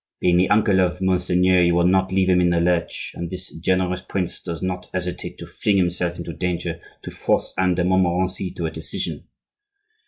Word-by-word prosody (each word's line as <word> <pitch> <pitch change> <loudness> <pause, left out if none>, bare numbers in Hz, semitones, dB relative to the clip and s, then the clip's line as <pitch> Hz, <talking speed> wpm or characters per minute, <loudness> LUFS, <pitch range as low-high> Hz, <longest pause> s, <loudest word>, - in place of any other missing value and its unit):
Being 90 -1 +3
the 90 +1 +3
uncle 105 -2 +4
of 90 -1 0
Monseigneur, 90 -1 +3
he 85 0 +4
will 85 0 +3
not 95 +1 +3
leave 95 0 +2
him 90 -1 +4
in 90 - +3
the 85 -1 +2
lurch; 85 0 0
and 85 -1 -5
this 90 +1 -8
generous 90 +1 0
prince 95 -1 -3
does 85 -1 -5
not 90 -1 -3
hesitate 90 -1 -4
to - - -8
fling 105 -2 0
himself 90 -1 0
into 85 -1 -6
danger 90 -1 -3 0.2
to - - -7
force - - 0
Anne 95 -1 +2
de 90 - +1
Montmorency 95 +1 +1
to 85 - -3
a 80 - -2
decision. 80 0 -5
90 Hz, 195 wpm, -22 LUFS, 85-95 Hz, 0.2 s, uncle